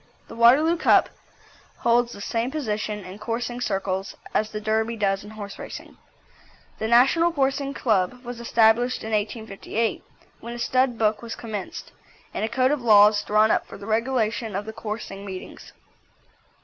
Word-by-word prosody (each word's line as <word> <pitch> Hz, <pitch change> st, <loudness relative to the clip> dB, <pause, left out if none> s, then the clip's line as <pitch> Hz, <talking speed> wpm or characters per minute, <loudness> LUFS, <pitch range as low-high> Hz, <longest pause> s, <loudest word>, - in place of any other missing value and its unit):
The -, -, -9 dB
Waterloo 275 Hz, +9 st, +5 dB
Cup -, -, +4 dB, 0.7 s
holds 235 Hz, 0 st, +2 dB
the 200 Hz, -, -9 dB
same 230 Hz, +3 st, -1 dB
position 215 Hz, -8 st, -3 dB
in 185 Hz, +3 st, -9 dB
coursing 240 Hz, +2 st, -3 dB
circles 195 Hz, -3 st, -2 dB, 0.2 s
as 215 Hz, -, +1 dB
the 215 Hz, -, -5 dB
Derby 220 Hz, +2 st, 0 dB
does 195 Hz, -2 st, 0 dB
in 205 Hz, -, -10 dB
horse 210 Hz, -2 st, -8 dB
racing. -, -, -9 dB, 0.8 s
The 220 Hz, -, -1 dB
National 270 Hz, +9 st, +4 dB
Coursing 275 Hz, -2 st, -1 dB
Club 225 Hz, +2 st, 0 dB
was 245 Hz, -1 st, -6 dB
established 235 Hz, +1 st, +3 dB
in 220 Hz, -, -5 dB
1858, 220 Hz, +1 st, -2 dB, 0.4 s
when 235 Hz, 0 st, -7 dB
a -, -, -6 dB
stud 255 Hz, 0 st, +1 dB
book 215 Hz, -1 st, +1 dB
was 230 Hz, -1 st, -6 dB
commenced, 230 Hz, -, -6 dB, 0.4 s
and -, -, -3 dB
a 220 Hz, -, 0 dB
code 255 Hz, +3 st, +2 dB
of 295 Hz, -3 st, 0 dB
laws 210 Hz, -2 st, +6 dB
drawn 215 Hz, +1 st, +3 dB
up -, -, +1 dB
for -, -, -10 dB
the 200 Hz, -, -10 dB
regulation 225 Hz, -1 st, -1 dB
of 205 Hz, +2 st, -3 dB
coursing 210 Hz, -3 st, -6 dB
meetings. 190 Hz, -2 st, -9 dB
225 Hz, 160 wpm, -24 LUFS, 210-245 Hz, 0.8 s, laws